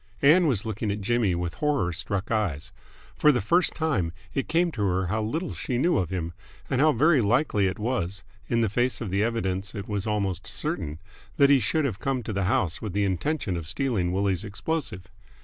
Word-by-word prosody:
Ann 165 Hz, +5 st, +6 dB
was 115 Hz, -8 st, +1 dB
looking 110 Hz, 0 st, -2 dB
at 100 Hz, +1 st, -2 dB
Jimmy 105 Hz, -3 st, +1 dB
with 85 Hz, -1 st, -3 dB
horror 145 Hz, -, 0 dB
struck 95 Hz, +4 st, -3 dB
eyes. 95 Hz, -10 st, -1 dB, 0.4 s
For 150 Hz, -, +5 dB
the 125 Hz, -, +1 dB
first 175 Hz, -, +2 dB
time 140 Hz, -, 0 dB, 0.2 s
it 135 Hz, -, -1 dB
came 170 Hz, +1 st, +2 dB
to 120 Hz, -, -5 dB
her 95 Hz, -1 st, +1 dB
how 110 Hz, +5 st, -1 dB
little 160 Hz, +11 st, -2 dB
she 125 Hz, -, -3 dB
knew 165 Hz, +3 st, +2 dB
of 90 Hz, -3 st, -1 dB
him 85 Hz, -2 st, -3 dB, 0.4 s
and 130 Hz, 0 st, +2 dB
how 155 Hz, +1 st, +6 dB
very 150 Hz, +2 st, +4 dB
likely 105 Hz, -2 st, +2 dB
it 95 Hz, -, -3 dB
was 105 Hz, -4 st, -2 dB, 0.3 s
in 115 Hz, -1 st, +2 dB
the 115 Hz, -, +3 dB
face 120 Hz, +5 st, 0 dB
of 115 Hz, -6 st, -4 dB
the 100 Hz, +1 st, +1 dB
evidence 100 Hz, -4 st, -1 dB
it 100 Hz, -, -5 dB
was 105 Hz, -1 st, -2 dB
almost 100 Hz, -5 st, -1 dB
certain 75 Hz, +1 st, -3 dB, 0.4 s
that 140 Hz, 0 st, +6 dB
he 140 Hz, -, +6 dB
should 150 Hz, +7 st, +1 dB
have 110 Hz, -8 st, -2 dB
come 135 Hz, -3 st, -1 dB
to 110 Hz, -, -4 dB
the 100 Hz, -1 st, 0 dB
house 95 Hz, -, 0 dB
with 105 Hz, -4 st, -4 dB
the 100 Hz, 0 st, +1 dB
intention 100 Hz, -, -1 dB
of 85 Hz, -2 st, -5 dB
stealing 100 Hz, -, 0 dB
Willie's 95 Hz, 0 st, 0 dB
explosive. 105 Hz, -, -3 dB
105 Hz, 210 wpm, -26 LUFS, 95-135 Hz, 0.4 s, Ann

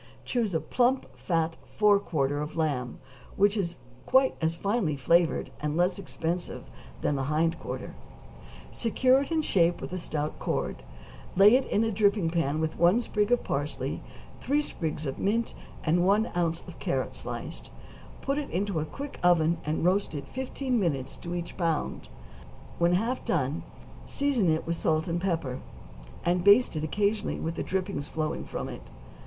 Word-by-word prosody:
= -, -, -25 dB
Choose 225 Hz, -8 st, 0 dB
a -, -, +3 dB
plump, 255 Hz, +7 st, +1 dB
fat 165 Hz, -2 st, -1 dB, 0.2 s
fore 205 Hz, -1 st, +5 dB
quarter 145 Hz, -6 st, -1 dB
of 150 Hz, -, -5 dB
lamb, 140 Hz, -6 st, -1 dB, 0.4 s
which 205 Hz, +1 st, +4 dB
is 175 Hz, -5 st, -1 dB, 0.3 s
quite 260 Hz, 0 st, +5 dB
as 160 Hz, +1 st, +1 dB
finely 195 Hz, -3 st, 0 dB
flavored 170 Hz, +5 st, +2 dB
and 150 Hz, +1 st, -2 dB
less 180 Hz, +2 st, +2 dB
expensive 175 Hz, -2 st, -3 dB, 0.4 s
than 145 Hz, -, +1 dB
the 135 Hz, -1 st, -1 dB
hind 160 Hz, +2 st, +1 dB
quarter; -, -, -6 dB, 0.8 s
secure 255 Hz, +3 st, +3 dB
it 280 Hz, -, -5 dB
in 320 Hz, -1 st, +2 dB
shape 175 Hz, -, +3 dB
with 185 Hz, -, -5 dB
stout 150 Hz, -2 st, -3 dB
cord, -, -, -2 dB, 0.5 s
lay 205 Hz, +5 st, +8 dB
it 265 Hz, -, +2 dB
in 210 Hz, -, +2 dB
a 225 Hz, -, +1 dB
dripping 200 Hz, -4 st, +2 dB
pan 155 Hz, -3 st, 0 dB
with 160 Hz, 0 st, -2 dB
one 175 Hz, +7 st, +5 dB
sprig 210 Hz, -2 st, 0 dB
of 245 Hz, -, +3 dB
parsley, 145 Hz, +2 st, -2 dB, 0.4 s
three 285 Hz, +2 st, +1 dB
sprigs 160 Hz, -, -3 dB
of 135 Hz, -, -4 dB
mint, 230 Hz, +4 st, 0 dB, 0.3 s
and 170 Hz, +2 st, +3 dB
one 205 Hz, +5 st, +3 dB
ounce 170 Hz, -1 st, 0 dB
of -, -, -10 dB
carrot -, -, -1 dB
sliced; -, -, -6 dB, 0.5 s
put 275 Hz, +2 st, 0 dB
it 290 Hz, -, -5 dB
into 195 Hz, -1 st, -1 dB
a 155 Hz, -, -1 dB
quick 280 Hz, -, -7 dB
oven, 170 Hz, -2 st, +4 dB
and 155 Hz, +2 st, 0 dB
roast 185 Hz, -2 st, +2 dB
it 140 Hz, -2 st, -5 dB
fifteen 260 Hz, -, -2 dB
minutes 140 Hz, -8 st, -1 dB
to 175 Hz, 0 st, -6 dB
each 170 Hz, -1 st, -5 dB
pound; 165 Hz, -4 st, -1 dB, 0.7 s
when 170 Hz, +1 st, +4 dB
half 230 Hz, +8 st, 0 dB
done 150 Hz, -1 st, 0 dB, 0.5 s
season 270 Hz, -10 st, +1 dB
it 160 Hz, 0 st, +1 dB
with 170 Hz, -, -1 dB
salt 160 Hz, -1 st, +1 dB
and 170 Hz, 0 st, -1 dB
pepper, 165 Hz, -9 st, -1 dB, 0.7 s
and 175 Hz, 0 st, +2 dB
baste 205 Hz, +1 st, +6 dB
it 155 Hz, -, -2 dB
occasionally 205 Hz, +6 st, 0 dB
with 165 Hz, -, -2 dB
the -, -, -4 dB
drippings 185 Hz, -6 st, -2 dB
flowing 155 Hz, -1 st, -2 dB
from -, -, -5 dB
it. -, -, -9 dB
175 Hz, 170 wpm, -28 LUFS, 160-210 Hz, 0.8 s, lay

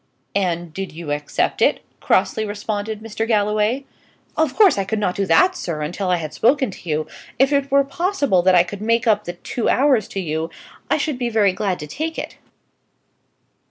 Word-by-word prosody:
"And 175 Hz, -4 st, -1 dB
did 195 Hz, +1 st, -5 dB
you 160 Hz, -2 st, -6 dB
accept 145 Hz, 0 st, -1 dB
it?" -, -, +3 dB, 0.2 s
crossly 195 Hz, +3 st, +1 dB
responded 210 Hz, 0 st, -4 dB
Mr. 225 Hz, 0 st, -3 dB
Galloway. 215 Hz, +4 st, +1 dB, 0.5 s
"Of 310 Hz, -4 st, +1 dB
course 400 Hz, -, +5 dB
I -, -, +1 dB
could 220 Hz, +3 st, -2 dB
not 205 Hz, -4 st, 0 dB
do 195 Hz, 0 st, -2 dB
that, 370 Hz, -, +4 dB
sir, 165 Hz, -, -4 dB
until 180 Hz, +5 st, -3 dB
I 180 Hz, -, +4 dB
had 155 Hz, -3 st, -5 dB
spoken 265 Hz, -, +2 dB
to 180 Hz, -, -11 dB
you. 155 Hz, 0 st, -1 dB, 0.3 s
If 270 Hz, +3 st, +3 dB
it 280 Hz, -1 st, +1 dB
were 280 Hz, 0 st, +4 dB
possible 285 Hz, -, +1 dB
that 185 Hz, +1 st, +4 dB
I 175 Hz, -, +6 dB
could 200 Hz, +3 st, -8 dB
make 230 Hz, +2 st, +1 dB
up 210 Hz, -2 st, +2 dB
the 175 Hz, -, -4 dB
two 215 Hz, +6 st, -3 dB
hours 260 Hz, -6 st, +3 dB
to 195 Hz, -, -5 dB
you, 160 Hz, -2 st, -2 dB, 0.4 s
I -, -, +3 dB
should 295 Hz, -6 st, -2 dB
be 240 Hz, -1 st, 0 dB
very 210 Hz, -4 st, +3 dB
glad 190 Hz, -2 st, -1 dB
to -, -, -5 dB
take 315 Hz, -, -4 dB
it." -, -, -6 dB
210 Hz, 195 wpm, -21 LUFS, 180-255 Hz, 0.5 s, I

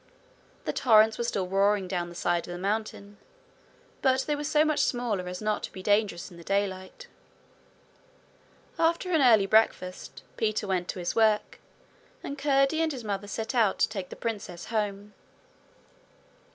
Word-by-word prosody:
The -, -, -1 dB
torrents 220 Hz, -2 st, +4 dB
were -, -, 0 dB
still 200 Hz, -5 st, -1 dB
roaring 195 Hz, +1 st, +2 dB
down 175 Hz, -2 st, -3 dB
the 175 Hz, -, -12 dB
side 175 Hz, 0 st, -1 dB
of -, -, -7 dB
the 175 Hz, -, -5 dB
mountain, 205 Hz, +1 st, -4 dB, 0.8 s
but 265 Hz, -1 st, +3 dB
they 295 Hz, +2 st, -1 dB
were 295 Hz, -, -5 dB
so 305 Hz, +1 st, +3 dB
much 310 Hz, -1 st, +1 dB
smaller 225 Hz, -7 st, 0 dB
as 180 Hz, +3 st, -6 dB
not 215 Hz, 0 st, 0 dB
to -, -, -6 dB
be 185 Hz, -, -9 dB
dangerous 205 Hz, -3 st, +1 dB
in 175 Hz, -, -13 dB
the 170 Hz, -, -12 dB
daylight. 195 Hz, -, -2 dB, 1.7 s
After 335 Hz, +3 st, +1 dB
an 320 Hz, -4 st, +3 dB
early 225 Hz, -6 st, +6 dB
breakfast, 195 Hz, -3 st, 0 dB
Peter 215 Hz, -1 st, 0 dB
went 185 Hz, -2 st, -1 dB
to -, -, -5 dB
his 175 Hz, -1 st, -3 dB
work 220 Hz, -2 st, +2 dB, 0.6 s
and 280 Hz, -, -5 dB
Curdie 275 Hz, +2 st, +2 dB
and 325 Hz, -1 st, +1 dB
his 255 Hz, -5 st, -6 dB
mother 205 Hz, -1 st, -3 dB
set 220 Hz, +4 st, -4 dB
out 225 Hz, -6 st, +2 dB
to -, -, +2 dB
take 195 Hz, -4 st, -5 dB
the -, -, -8 dB
princess 205 Hz, -6 st, -5 dB
home. 205 Hz, -1 st, -2 dB
210 Hz, 165 wpm, -27 LUFS, 190-245 Hz, 1.7 s, early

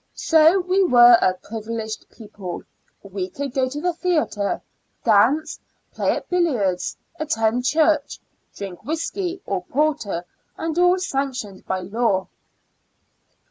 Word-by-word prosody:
So 320 Hz, +3 st, +5 dB
we 370 Hz, +2 st, +2 dB
were 240 Hz, -7 st, +7 dB
a 185 Hz, -, +3 dB
privileged 220 Hz, +2 st, -6 dB
people; 205 Hz, -5 st, -8 dB, 0.4 s
we 195 Hz, -2 st, -5 dB
could 280 Hz, +2 st, -5 dB
go 260 Hz, -2 st, +1 dB
to 290 Hz, +3 st, -5 dB
the 355 Hz, +3 st, 0 dB
theatre, 315 Hz, -, 0 dB, 0.4 s
dance, 230 Hz, +8 st, +3 dB, 0.3 s
play -, -, +1 dB
at -, -, -8 dB
billiards, 250 Hz, -, 0 dB, 0.2 s
attend 245 Hz, -5 st, 0 dB
church, 305 Hz, +1 st, +2 dB, 0.4 s
drink 190 Hz, -3 st, -7 dB
whiskey 350 Hz, +4 st, -3 dB
or 195 Hz, -2 st, -2 dB
porter, 260 Hz, -, -1 dB, 0.3 s
and 325 Hz, -1 st, -3 dB
all 360 Hz, +1 st, +5 dB
sanctioned 270 Hz, -, -3 dB
by 190 Hz, 0 st, -1 dB
law. 195 Hz, 0 st, 0 dB
250 Hz, 120 wpm, -22 LUFS, 205-315 Hz, 0.4 s, were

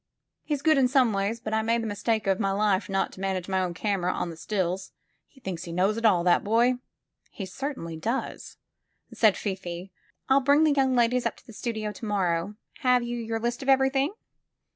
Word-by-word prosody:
He's 290 Hz, -3 st, -3 dB
good 310 Hz, -2 st, +5 dB
in 260 Hz, -, +4 dB
some 255 Hz, -4 st, +3 dB
ways, 200 Hz, +4 st, -1 dB
but 220 Hz, -2 st, -5 dB
I 220 Hz, -, +2 dB
made 230 Hz, +1 st, +1 dB
the -, -, -3 dB
mistake 215 Hz, +1 st, -1 dB
of 195 Hz, -1 st, +1 dB
my 200 Hz, -3 st, +1 dB
life 200 Hz, -1 st, +1 dB
not 195 Hz, 0 st, 0 dB
to -, -, -13 dB
manage 190 Hz, -2 st, -2 dB
my 190 Hz, -1 st, +1 dB
own 180 Hz, -2 st, -2 dB
camera 185 Hz, -2 st, 0 dB
on 170 Hz, -, -3 dB
the -, -, -9 dB
stills. 185 Hz, +1 st, -2 dB, 0.3 s
He 270 Hz, -, -22 dB
thinks 185 Hz, -7 st, -5 dB
he 170 Hz, -, -7 dB
knows 190 Hz, +5 st, +1 dB
it 230 Hz, 0 st, -2 dB
all, 180 Hz, -5 st, +3 dB
that 175 Hz, 0 st, +3 dB
boy!" 235 Hz, +4 st, +3 dB, 0.5 s
''He 195 Hz, -, -6 dB
certainly 190 Hz, -, -5 dB
does," 230 Hz, +10 st, -4 dB, 0.6 s
said 215 Hz, -4 st, +4 dB
Fifi. 190 Hz, -2 st, -5 dB, 0.4 s
*'I'll 270 Hz, +1 st, +4 dB
bring 285 Hz, +3 st, +4 dB
the 310 Hz, -2 st, +4 dB
young 265 Hz, -2 st, +2 dB
ladies 245 Hz, +1 st, +2 dB
up -, -, -5 dB
to -, -, -20 dB
the 230 Hz, -, -12 dB
studio 220 Hz, -1 st, -3 dB
to 210 Hz, -, -9 dB
morrow. 190 Hz, -2 st, 0 dB, 0.2 s
Have 250 Hz, -1 st, +3 dB
you 240 Hz, 0 st, -3 dB
your 225 Hz, -1 st, -3 dB
list 240 Hz, +2 st, -2 dB
of 270 Hz, -, -3 dB
everything?" 270 Hz, +5 st, +3 dB
215 Hz, 210 wpm, -27 LUFS, 190-250 Hz, 0.6 s, good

